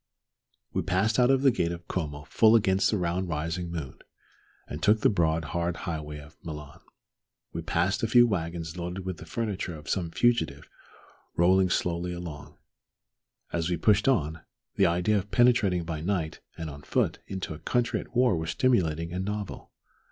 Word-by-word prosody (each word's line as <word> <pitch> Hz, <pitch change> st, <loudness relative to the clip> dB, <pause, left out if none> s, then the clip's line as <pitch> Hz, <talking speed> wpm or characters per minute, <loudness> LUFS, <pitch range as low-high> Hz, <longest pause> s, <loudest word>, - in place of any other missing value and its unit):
We -, -, +1 dB
passed 105 Hz, +6 st, +1 dB
out 125 Hz, 0 st, +5 dB
of 135 Hz, 0 st, +3 dB
the 135 Hz, -, +6 dB
gate 85 Hz, -7 st, 0 dB
of 85 Hz, 0 st, -8 dB
Como 75 Hz, -5 st, -3 dB
full 110 Hz, +9 st, +4 dB
against 95 Hz, -3 st, +3 dB
the 105 Hz, -, +1 dB
round 90 Hz, +1 st, -1 dB
rising 85 Hz, +2 st, -2 dB
moon, 80 Hz, -6 st, -6 dB, 0.7 s
and 75 Hz, -, -6 dB
took 105 Hz, +3 st, +4 dB
the -, -, +4 dB
broad 80 Hz, -4 st, +1 dB
hard 85 Hz, 0 st, 0 dB
highway 75 Hz, -4 st, -4 dB
for 75 Hz, -, -21 dB
Milan. 75 Hz, -4 st, -8 dB, 0.7 s
We 85 Hz, -, -3 dB
passed 85 Hz, +5 st, 0 dB
a 115 Hz, -, +1 dB
few 120 Hz, +2 st, +7 dB
wagons 85 Hz, -5 st, -3 dB
loaded 90 Hz, +2 st, -5 dB
with 95 Hz, -2 st, -4 dB
the 80 Hz, -, -11 dB
furniture 100 Hz, -3 st, -3 dB
of 75 Hz, +1 st, -12 dB
some 90 Hz, -4 st, -1 dB
fugitive 120 Hz, +7 st, +1 dB, 0.7 s
rolling 95 Hz, +2 st, +4 dB
slowly 90 Hz, 0 st, -1 dB
along. 85 Hz, -4 st, -8 dB, 1.0 s
As 85 Hz, 0 st, 0 dB
we 90 Hz, -, 0 dB
pushed 105 Hz, +5 st, +3 dB
on, 80 Hz, -, +1 dB, 0.3 s
the 95 Hz, -, +4 dB
idea 90 Hz, +5 st, +2 dB
of 100 Hz, +2 st, -8 dB
penetrating 110 Hz, -8 st, +3 dB
by 80 Hz, -2 st, -4 dB
night 85 Hz, -3 st, -2 dB, 0.2 s
and 80 Hz, -, -4 dB
on 70 Hz, -1 st, -8 dB
foot -, -, 0 dB
into 95 Hz, -4 st, -4 dB
a 75 Hz, -, -9 dB
country 120 Hz, +8 st, 0 dB
at 125 Hz, -, -11 dB
war 125 Hz, -5 st, +4 dB
was 80 Hz, -1 st, -3 dB
stimulating 85 Hz, -10 st, +1 dB
and 90 Hz, +1 st, -2 dB
novel. 105 Hz, 0 st, -5 dB
90 Hz, 175 wpm, -28 LUFS, 80-105 Hz, 1.0 s, few